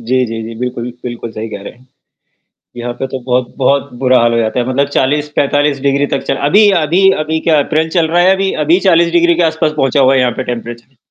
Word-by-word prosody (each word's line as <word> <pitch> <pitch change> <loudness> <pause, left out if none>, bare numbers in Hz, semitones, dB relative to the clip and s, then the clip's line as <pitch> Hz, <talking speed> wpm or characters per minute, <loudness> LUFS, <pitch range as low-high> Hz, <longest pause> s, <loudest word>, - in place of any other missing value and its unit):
जी, 130 +2 0
जी, 115 0 -5
जी, 115 +1 -8
बिल्कुल, 125 -1 -4
बिल्कुल 120 -1 -6
सही 110 +1 -6
कह 100 - -8
रहे - - -9
हैं। 125 +3 -24 0.9
यहाँ 120 0 -4
पे 135 - -4
तो 130 0 -6
बहुत 125 0 -1
बहुत 140 +1 0
बुरा 130 -1 +3
हाल 120 0 +2
हो 115 - +1
जाता 110 +1 -1
है, 120 - -2
मतलब 140 +2 0
40-45 145 0 0
डिग्री 140 +1 +1
तक 135 - -3
चल - - 0
अभी 205 +5 +5
अभी 175 +6 +3 0.2
अभी 160 +1 -2
क्या 155 -3 +2
अप्रैल 160 +2 -1
चल 165 -2 +1
रहा 175 +1 +2
है, 185 - +4
अभी 195 0 -1
अभी 170 +5 +3
40 170 -1 +3
डिग्री 170 0 +3
के 175 - 0
आसपास 160 -1 -1
पहुँचा 135 0 +1
हुआ 135 0 +4
है 130 - +3
यहाँ 125 -1 +1
पे 130 - -2
टेंपरेचर। 120 +2 -7
135 Hz, 240 wpm, -13 LUFS, 125-160 Hz, 0.9 s, अभी